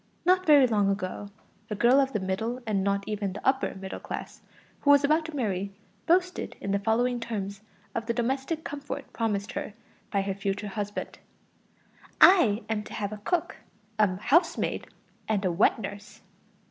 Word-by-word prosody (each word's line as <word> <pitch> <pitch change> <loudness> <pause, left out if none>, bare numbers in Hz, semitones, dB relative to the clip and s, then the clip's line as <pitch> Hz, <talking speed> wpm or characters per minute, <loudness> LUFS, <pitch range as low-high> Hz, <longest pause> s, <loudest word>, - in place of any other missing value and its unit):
Not 370 0 +3
very 290 -3 +8
long 210 -4 +2
ago, 195 +1 -3 0.4
a 210 - -2
girl 240 +6 +5
of 270 -1 +2
the 215 - -1
middle 210 +6 -2
and 205 -3 0
not 200 0 0
even 205 -3 -3
the 205 - -6
upper 265 -4 +1
middle 190 0 -6
class, - - -7 0.4
who 285 - 0
was 285 0 +7
about 310 +3 +3
to 320 -2 -7
marry, 200 -6 -2 0.3
boasted 360 +2 +1
in 200 - -3
the 200 - +2
following 240 +4 +1
terms 200 -4 -4 0.3
of 225 -1 -3
the 235 - +1
domestic 270 +6 -1
comfort 285 -1 -6
promised 210 -3 -1
her 205 - -5 0.4
by 200 -1 +1
her 195 0 -2
future 200 +1 -3
husband: 205 0 -5 1.0
"I 240 - +6
am 220 -1 -1
to - - -10
have 205 -1 -3
a - - -6
cook, 350 +4 -1 0.4
a 200 -4 +3
housemaid, 290 - +1 0.4
and 205 -2 0
a 185 - +2
wet 175 +5 +3
nurse." 205 0 -8
215 Hz, 170 wpm, -27 LUFS, 200-270 Hz, 1.0 s, very